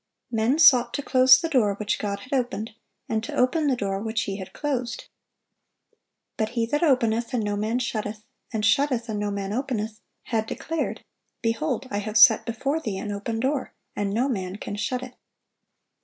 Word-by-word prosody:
Men 230 +5 +2
sought 255 -7 +6
to 285 - -3
close 255 -1 +6
the 330 - -2
door 235 -10 +2
which 205 0 -2
God 200 -1 -3
had 255 - -8
opened, 240 -4 -1 0.4
and 220 -1 -1
to - - -5
open 295 +5 +2
the 270 - +3
door 195 -4 -2
which 220 -1 -1
He 195 -1 -4
had 190 -2 -8
closed. 255 -6 -3 1.3
But 220 -1 0
"He 230 - +2
that 295 +6 -1
openeth, 240 -5 +2
and 230 - 0
no 205 0 -1
man 215 +3 -1
shutteth; 215 -3 -3 0.3
and 215 -3 -1
shutteth, 250 -1 +2
and 210 -1 -2
no 205 0 -1
man 200 0 -3
openeth," 225 -4 -3 0.2
had 220 -2 -1
declared, 325 +6 -3 0.4
"Behold, 260 +3 -1
I 205 - -1
have 215 +1 -2
set 220 +1 +7
before 275 +7 -1
thee 215 -11 -4
an 205 +2 -4
open 210 +3 -3
door, 265 +3 -1 0.2
and 200 -1 -1
no 235 +6 +1
man 190 -7 -3
can 205 - -6
shut 250 +5 -2
it." 255 -1 -9
230 Hz, 185 wpm, -25 LUFS, 210-255 Hz, 1.3 s, set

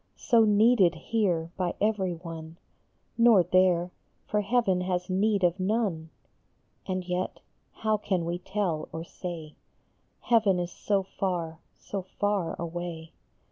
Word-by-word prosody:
So 235 -4 +4
needed 210 -4 +4
here 170 -3 -1
by 180 -2 -1
every 200 -4 +1
one, 165 -1 -9 0.6
Nor 230 -6 +7
there; 180 -1 +3 0.3
for 210 - 0
heaven 200 -4 +1
has 180 0 -2
need 200 +1 +2
of 175 +2 +2
none. 185 -5 -1 0.8
And 185 -1 -2
yet, 180 +1 -2 0.3
how 215 -1 0
can 190 -4 -1
we 170 +1 -2
tell 180 -5 -2
or 165 - -5
say? 170 -3 -7 0.7
Heaven 220 -6 +3
is 175 0 -2
so 200 0 0
far, 175 -4 -3 0.2
so 200 - -5 0.2
far 205 -5 0
away 170 -1 -5
185 Hz, 130 wpm, -28 LUFS, 170-205 Hz, 0.8 s, Nor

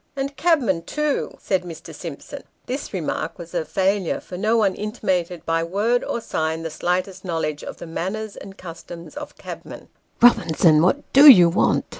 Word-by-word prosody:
" - - -44
And 275 +1 -3
cabmen, 270 - +2
too," 300 - -2
said 190 -2 0
Mr. 165 -2 -10
Simpson. 170 - -8 0.2
This 260 +3 -5
remark - - -3
was - - -10
a - - 0
failure, 195 - 0
for 180 - -10
no 215 +5 +1
one 205 -4 +2
intimated, 185 -5 -3
by 165 0 0
word 210 +8 0
or - - -3
sign, 160 -6 -2
the 165 - -4
slightest 185 +3 -2
knowledge 160 -4 -3
of - - -8
the - - -8
manners 195 +6 -4
and 195 0 -11
customs 170 -1 -10
of 295 0 -8
cabmen. - - -10 0.2
" - - -42
Eobinson, 160 -9 +5
what 185 - 0
do 285 +2 +10
you 180 -10 +9
want 170 - +1
190 Hz, 180 wpm, -22 LUFS, 170-235 Hz, 0.2 s, do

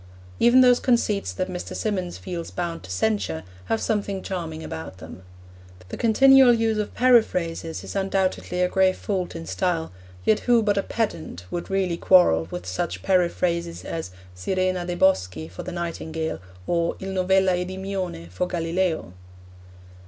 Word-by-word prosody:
Even 240 +2 +6
those 250 -1 +6
conceits 225 -5 +1
that 185 -1 -3
Mr. 180 -1 -6
Symonds 185 -5 -2
feels 175 -3 -6
bound 170 -2 -4
to 95 - -12
censure 95 -4 -1 0.2
have 110 +4 0
something 200 - -1
charming 165 -4 -5
about 80 +3 -7
them. 95 - -11 0.7
The - - -5
continual 265 +2 +6
use 225 -1 +1
of 210 - -3
periphrases 180 -10 +2
is - - -8
undoubtedly 190 -2 0
a - - +3
grave 190 0 +2
fault 185 -4 -3
in 165 0 -6
style, 175 -3 -1 0.3
yet 215 - +4
who 240 -2 +3
but 205 -1 +2
a 200 - +2
pedant 165 - -3
would 175 - -4
really 190 -3 0
quarrel 80 - +5
with 90 0 -6
such 90 0 -3
periphrases 170 -2 0
as 165 - -4 0.3
sirena 185 - -1
de' 175 - -2
boschi 90 - +1
for 90 +3 -8
the - - -6
nightingale, 165 -2 -4 0.3
or 170 -1 0
il 195 - -5
novella 190 0 +3
Edimione 185 - -4
for 180 - -1
Galileo? 165 - -1
180 Hz, 150 wpm, -24 LUFS, 165-195 Hz, 0.7 s, Even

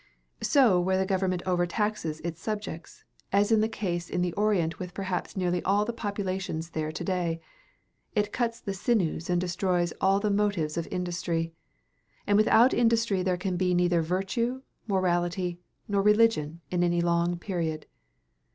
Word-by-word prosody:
So 245 -11 +4
where 185 +1 +1
the 190 - +1
government 185 -2 0
over 175 -1 +1
taxes 175 -6 -2
its 165 0 -5
subjects, 210 -6 -5 0.3
as 200 +2 +3
is 220 - +5
the 220 - +1
case 175 -5 -3
in 180 - 0
the 175 -1 -1
Orient 200 -6 +1
with 180 -1 -7
perhaps 190 -1 -3
nearly 180 -1 0
all 200 +2 +2
of - - 0
the 235 - -3
populations 190 -6 -3
there 155 -1 -2
to 155 - -5
day, 170 -2 -1 0.8
it 210 0 0
cuts 235 -1 -1
the 195 - -4
sinews 185 -5 0
and 175 0 +2
destroys 175 -1 0
all 195 +1 +4
the 210 0 0
motives 200 -7 0
of 170 -1 -2
industry; 170 -2 -2 0.7
and 205 - +2
without 220 +4 +5
industry 230 -4 +2
there 180 -1 0
can 180 0 -2
be 180 0 +1
neither 175 -1 +3
virtue, 195 +10 -1 0.2
morality, 175 -2 0 0.3
nor 200 -1 +1
religion 210 -7 +3
in 175 -1 +1
any 175 0 +2
long 170 0 +1
period. 170 -4 -3
185 Hz, 165 wpm, -28 LUFS, 175-205 Hz, 0.8 s, is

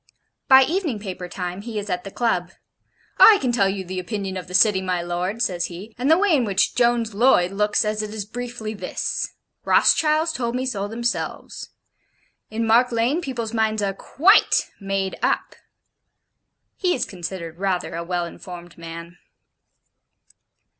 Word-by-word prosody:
By 265 -1 +8
evening 320 - -1
paper 185 -3 -7
time 180 +1 -5
he 225 0 -6
is 205 0 -4
at 180 -2 -2
the - - -5
Club: 190 -5 -1 0.7
'I 435 - +9
can 255 - 0
tell 200 -5 +2
you 195 0 -3
the 185 +1 -4
opinion 195 0 -4
of 185 -1 -6
the 180 - -5
City, 195 -1 +4
my 185 -1 -1
lord,' 180 +6 -2
says 175 -2 -1
he, 190 +6 -9
'and 255 +4 -1
the 320 - +6
way 385 -3 +3
in 265 - +2
which 200 -3 +1
Jones 235 -2 +1
Loyd 200 -5 +3
looks 210 +2 +1
at 210 0 -1
it 210 -1 -5
is 215 -2 -5
briefly 240 -1 -6
this: 185 -4 -3 0.3
Rothschilds 315 +1 +3
told 240 -5 -2
me 255 +1 -1
so 205 -6 -2
themselves. 235 +2 -4 0.8
In 225 +1 -2
Mark 235 +3 +4
Lane, 240 +8 +1
people's 235 -7 -4
minds 220 -2 0
are 195 -1 0
QUITE 340 - +3
made 195 -1 -3
up.' - - 0 1.2
He 360 -2 +1
is 255 - -1
considered 175 -2 -7
rather 190 -2 -1
a 170 - -4
well 175 0 -2
informed 175 0 -10
man. 170 +1 -9
210 Hz, 165 wpm, -22 LUFS, 185-240 Hz, 1.2 s, I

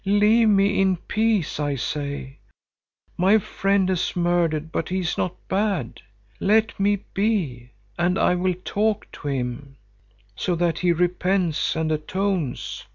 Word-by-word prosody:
'Leave 210 +3 +4
me 200 -1 +3
in 190 -1 +2
peace,' 215 -4 0
I 145 -1 0
say. 140 +1 -4 0.8
'My 190 +5 +5
friend 195 -1 0
has 185 -2 -1
murdered, 170 -3 0
but 160 - -2
he 185 - -1
is 175 -3 -1
not 180 - -2
bad. 190 - -1 0.4
Let 215 +1 +2
me 200 0 +1
be, 175 - -1 0.3
and 180 +2 +2
I - - +3
will 180 0 0
talk 215 0 -1
to 145 - -8
him, 135 0 -4 0.6
so 180 - -1
that 170 -1 0
he 180 -1 +2
repents 180 0 +1
and 160 0 -1
atones. 170 -1 -2
180 Hz, 140 wpm, -23 LUFS, 155-200 Hz, 0.8 s, My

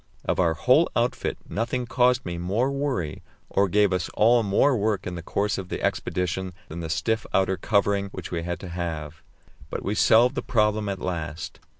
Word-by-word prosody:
Of - - 0
our 85 -3 +3
whole 80 - +4
outfit - - 0
nothing 120 +3 -2
caused 125 +1 +2
me 85 -1 -4
more 105 +10 0
worry 135 - -2 0.3
or 100 0 +2
gave 105 0 +3
us 90 -2 -1
all 120 +2 +5
more 110 +7 +3
work 105 -3 0
in 90 - -4
the 85 - -5
course 100 +4 -1
of 95 -2 -7
the - - -3
expedition 90 +1 -1 0.2
than 80 - -6
the 80 -1 -5
stiff 110 +7 0
outer 95 0 +3
covering 100 -1 +1
which - - -8
we 85 -2 -2
had 85 +1 -4
to 95 - -7
have; 80 -3 -5 0.5
but - - -4
we 100 - -1
solved 115 +4 +5
the - - -2
problem 105 -4 +1
at 100 - -2
last. 80 -4 -5
100 Hz, 195 wpm, -25 LUFS, 85-110 Hz, 0.5 s, all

